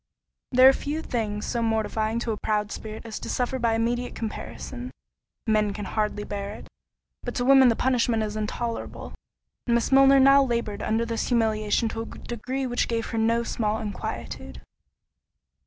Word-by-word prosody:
There 255 0 +7
are 270 - +8
few 300 +4 -3
things 210 -6 -2
so 235 - -1
mortifying 220 0 0
to 235 - -2
a 215 - -2
proud 210 -1 -1
spirit 220 +1 -7
as 220 -2 -6
to - - -7
suffer 255 +1 -1
by 230 -2 +2
immediate 240 +2 -1
comparison—men 220 -2 -4
can 205 -1 -5
hardly 210 0 -1
bear 200 -1 -5
it, - - -12 0.5
but - - -5
to 245 - 0
women 270 -1 +7
the 230 - +4
punishment 240 -3 +1
is 210 0 -4
intolerable; 225 +2 -4 0.5
and 235 - +3
Miss 235 - 0
Milner 270 0 +7
now 275 +1 +7
laboured 235 -5 -1
under 225 +2 0
this 230 -1 -2
humiliation 220 -1 +1
to 225 - -4
a - - -5
degree 255 +5 -5
which 245 -1 0
gave 230 -1 -1
her 225 - -1
no 230 +1 +2
small 215 -2 -1
inquietude. 210 -2 -6
230 Hz, 170 wpm, -26 LUFS, 215-245 Hz, 0.5 s, are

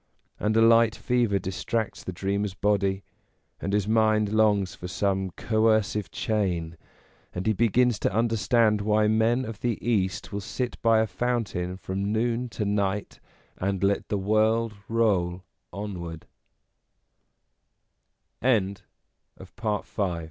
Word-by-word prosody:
And 110 +1 +1
a 115 - +6
light 115 -1 +5
fever 120 -5 +1
distracts 105 +4 -3
the - - -5
dreamer's 100 +2 -2
body, 100 0 +1 0.6
and 100 - -3
his 105 -1 +1
mind 110 -1 +2
longs 105 -3 +3
for 90 - -8
some 95 +1 -1
coercive 110 -2 +1
chain, 90 -7 -1 0.6
and 90 - -3
he 110 - +3
begins 115 +1 +2
to - - 0
understand 110 0 +2
why 105 +1 +2
men 115 +4 +2
of 110 -2 -7
the 120 -3 -1
East 95 -5 0
will 100 - -2
sit 125 +4 -4
by 115 -1 +4
a - - +2
fountain 100 -5 -2
from 100 +2 -3
noon 120 +2 0
to 110 -2 -3
night, 100 0 -1 0.4
and 95 0 -1
let 100 0 +1
the 105 - 0
wo 105 -3 +1
105 Hz, 115 wpm, -26 LUFS, 100-115 Hz, 0.6 s, a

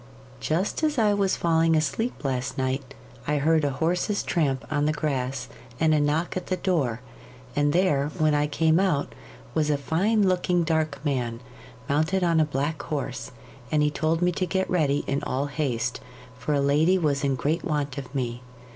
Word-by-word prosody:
'Just 175 - -1
as 305 -2 +1
I 215 -3 +4
was 200 -2 +1
falling 165 -1 +3
asleep 190 +10 -1
last 130 -2 -2
night, 130 0 -2 0.3
I 150 0 +1
heard 155 +2 +3
a 145 - +2
horse's 175 +8 0
tramp 140 -6 0
on 150 -1 +1
the - - +3
grass 135 -4 -2 0.3
and 160 -1 +3
a 155 - +3
knock 150 +4 0
at 185 - -4
the 185 - -1
door, 140 -12 0 0.5
and 145 0 +2
there, 150 -5 +2
when 155 -2 +3
I 145 0 +2
came 160 +2 +2
out, 180 -7 0 0.4
was 155 -2 +1
a 145 - +2
fine 200 +9 +1
looking 180 -1 +2
dark 160 -2 0
man, 120 -5 -1 0.5
mounted 160 +6 +1
on 170 -2 +3
a 155 - +4
black 145 +2 -2
horse, 130 -5 -4 0.4
and 150 -1 +3
he 150 - +2
told 160 +3 0
me 180 - +3
to 185 +1 -2
get 190 +2 0
ready 145 -5 +2
in 140 +1 -1
all 135 +2 -1
haste, 130 -5 -2 0.4
for 145 +4 -1
a 140 - +2
lady 150 +6 +3
was 145 -4 0
in 135 -1 +1
great 150 +7 -1
want 145 -5 -2
of 135 0 -10
me. 120 -2 -2
150 Hz, 185 wpm, -25 LUFS, 140-170 Hz, 0.5 s, I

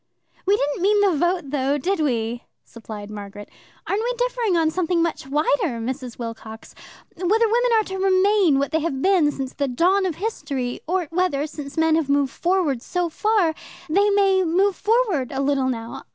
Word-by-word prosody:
"We 405 +1 +4
didn't 290 +2 -2
mean 410 +2 +3
the 390 -4 +3
vote, 345 -2 0
though, 280 0 0
did 370 +6 -1
we?" 240 -5 -1 0.2
supplied 215 -2 -9
Margaret. 205 0 -9 0.4
"Aren't 400 +2 -1
we - - -1
differing 485 -6 0
on 320 -1 +2
something 355 0 0
much 330 -5 -3
wider, 290 -1 0
Mrs. 250 +1 -5
Wilcox? 225 -1 -8 0.4
Whether 415 +6 +2
women 485 +2 +2
are 440 - +3
to 385 -1 -6
remain 380 -4 +3
what 280 0 -1
they 320 - +1
have 285 -4 -3
been 365 -6 +3
since 265 -2 -5
the 280 - -1
dawn 365 +9 +2
of 340 - -3
history; 275 - -4
or 360 +1 0
whether, 330 -5 0
since 295 -1 -8
men 320 0 +3
have 310 -4 -1
moved 280 -1 +1
forward 345 -9 0
so 355 +5 -2
far, 400 -1 +1 0.3
they 395 +6 +3
too 400 - +2
may 390 -2 +3
move 370 +4 +2
forward 415 - +1
a 270 - -3
little 275 -1 +1
now. 230 -2 -6
320 Hz, 185 wpm, -22 LUFS, 270-385 Hz, 0.4 s, We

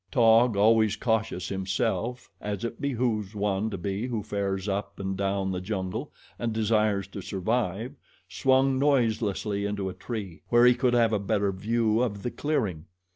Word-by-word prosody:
Taug, 115 -3 +4
always 110 0 +4
cautious 110 -5 -1
himself, 105 +6 -2
as 105 -1 -4
it 115 0 -6
behooves 115 -6 -1
one 105 +1 0
to 105 - -4
be 100 +5 -3
who 115 -4 -3
fares 100 -1 -2
up 100 +1 -3
and 95 0 -2
down 95 0 -1
the 90 -1 -3
jungle 95 -2 -4 0.3
and 120 -1 -1
desires 110 -2 +1
to 100 - -7
survive, 110 +4 -2 0.3
swung 130 0 +2
noiselessly 110 -7 +1
into 100 -2 -2
a - - -6
tree, 100 -10 -6
where 120 0 +6
he 125 - +7
could 120 0 +1
have 115 -2 +3
a 105 - +2
better 100 0 0
view 110 +3 +1
of 105 -5 -2
the 120 - -2
clearing. 105 - -2
105 Hz, 165 wpm, -27 LUFS, 100-120 Hz, 0.3 s, he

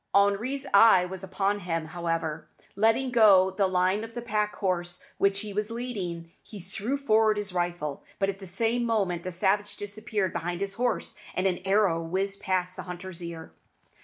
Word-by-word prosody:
Henri's 210 +8 +2
eye 200 -3 +7
was 190 +1 -7
upon 195 +2 0
him, 165 -3 -2
however. 165 -2 -3 0.3
Letting 225 +5 +2
go 200 -5 +6
the 195 +1 +1
line 185 +3 +1
of 225 0 -9
the 240 - -3
pack 210 -2 -1
horse 175 -2 -2 0.2
which 195 0 +2
he 210 -2 -6
was 210 +2 -1
leading, 195 -9 -5
he 210 - -11
threw 195 +8 -3
forward 220 -5 +3
his 205 -2 -4
rifle; 175 -5 -2
but 195 - +1
at 195 0 -3
the 195 - -9
same 230 +6 0
moment 200 -7 0
the 185 - -5
savage 195 +4 0
disappeared 205 -2 -3
behind 175 +1 -3
his 200 0 -2
horse, 245 +4 -1 0.2
and 185 - 0
an 180 -2 +1
arrow 195 -4 +3
whizzed 195 +4 -2
past 185 -1 -1
the - - -6
hunter's 180 0 -7
ear. 170 -1 -7
195 Hz, 180 wpm, -27 LUFS, 175-215 Hz, 0.3 s, eye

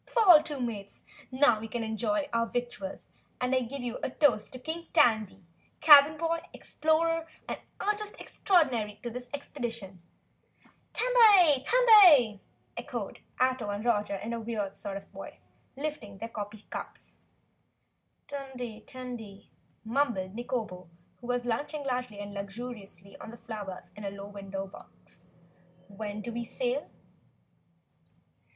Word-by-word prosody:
Fall 375 -10 +7
to, 295 -2 -5
Mates, 210 -5 -5 0.3
now 255 -4 +4
we 225 - -6
can 230 +1 -3
enjoy 240 +7 -1
our 230 0 +2
victuals 240 -6 -5 0.3
and 250 +1 0
I 260 - +4
give 250 +2 -5
you 240 -1 -4
a - - -1
toast 250 -6 +2
to - - -6
King 320 +6 -5
Tandy, 220 - +3 0.3
Cabin 295 0 +8
Boy, 330 +1 0
Explorer 330 +1 0 0.2
and - - -4 0.2
Artist 420 0 -2
Extraordinary 240 - +1
to 240 - -4
this 245 +1 -7
Expedition!" 235 -10 -6 0.9
"Tandy! 415 - +6
Tandy!" 360 - +7 0.3
echoed - - -5 0.2
Ato 255 -4 +1
and 205 +2 -4
Roger, 205 -4 +1 1.6
lifting 285 -9 -5
their 230 +4 -6
coffee 210 -1 -7
cups. - - -8 1.1
"Tandy! 260 -5 -6
Tandy!" 240 -6 -9 0.3
mumbled 225 -6 0
Nikobo, 215 -7 -4 0.3
who 240 - -11
was 245 0 -1
lunching 290 +5 -2
largely 250 -5 -3
and 205 0 -7
luxuriantly 200 -2 -8
on - - -9
the 235 - -10
flowers 210 -5 -7
in 210 - -9
a 200 - -2
low 200 0 -8
window 195 -1 -6
box. 180 -2 -15 0.6
"When 205 +1 -6
do 235 - -5
we 235 +1 -3
sail?" - - -2
240 Hz, 125 wpm, -29 LUFS, 210-290 Hz, 1.6 s, Cabin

